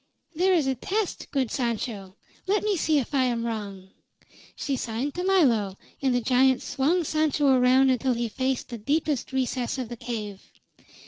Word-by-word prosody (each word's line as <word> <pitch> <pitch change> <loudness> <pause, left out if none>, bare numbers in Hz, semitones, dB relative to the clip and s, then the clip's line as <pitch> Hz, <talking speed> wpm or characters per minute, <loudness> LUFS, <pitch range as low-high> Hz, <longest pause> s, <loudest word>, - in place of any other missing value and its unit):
There 370 +4 +2
is 315 -5 +2
a 265 - +1
test, 390 - -3
good 265 -5 -1
Sancho. 220 -6 -3 0.3
Let 410 +2 +1
me 420 -1 +1
see 315 -3 +2
if 275 0 -2
I 265 -2 +3
am 235 -2 -1
wrong!" 200 -4 -5 0.6
She 280 - -2
signed 245 +3 -3
to 360 - -3
Milo, 240 - +2 0.2
and 265 -3 +2
the 245 - +1
giant 260 +2 +3
swung 315 +6 +1
Sancho 305 -2 +1
around 260 +1 +5
until 255 0 +1
he 235 0 -1
faced 260 +3 -2
the 235 -2 -6
deepest 285 +3 -1
recess 255 -1 -1
of 250 -3 -4
the 240 - -7
cave. 215 -5 -5
260 Hz, 175 wpm, -26 LUFS, 235-290 Hz, 0.6 s, around